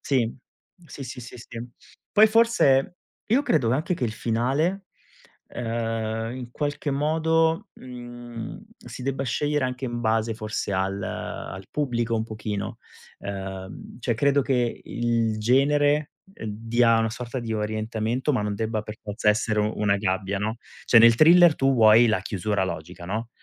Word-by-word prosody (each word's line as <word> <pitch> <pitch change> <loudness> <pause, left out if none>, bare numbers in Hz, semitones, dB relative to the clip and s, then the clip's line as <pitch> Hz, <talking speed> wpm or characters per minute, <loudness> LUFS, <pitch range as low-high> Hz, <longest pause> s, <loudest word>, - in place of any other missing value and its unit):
Sì, 120 -5 0 0.5
sì, 145 - -9
sì, 125 +1 -7
sì, 120 - -10
sì. 115 0 -9 0.5
Poi 215 +1 +7
forse 215 - +3 0.3
io 250 +6 +3
credo 135 - +2
anche 155 +8 0
che 130 - -2
il 110 - -2
finale, 135 - -1 0.7
uhm, 115 -1 -2
in 125 -2 -7
qualche 145 +2 -3
modo, 160 +3 +1
mhmm, 120 - -9 0.2
si 120 +1 -10
debba 135 +1 -2
scegliere 145 +3 0
anche 125 +1 -5
in 120 -1 -3
base 115 0 +1
forse 110 -2 -4
al 95 +1 -1
al 95 0 -6
pubblico 120 -5 -1
un 110 -1 0
pochino. 105 0 -5 0.4
Ehm, 95 +1 -7
cioè 120 0 0
credo 140 +4 +3
che 125 -3 0
il 115 -2 -1
genere, 145 +5 +2 0.2
uhm, 115 - -8
dia 115 +2 +2
una 115 0 +1
sorta 120 +3 -5
di 115 -1 -4
orientamento, 110 +5 -1
ma 125 - +1
non 105 0 -2
debba 110 +1 -2
per 105 0 -8
forza 105 +1 -1
essere 105 0 +2
u 105 +1 0
una 105 -1 +2
gabbia, 95 0 -1
no, 110 +3 -2 0.3
cioè 120 - +7
nel 115 0 +8
thriller 170 +4 +7
tu 135 0 +2
vuoi 115 0 +7
la 110 -4 +1
chiusura 100 +1 -1
logica, 85 0 -6
no, 110 +4 -3
115 Hz, 155 wpm, -25 LUFS, 110-135 Hz, 0.7 s, nel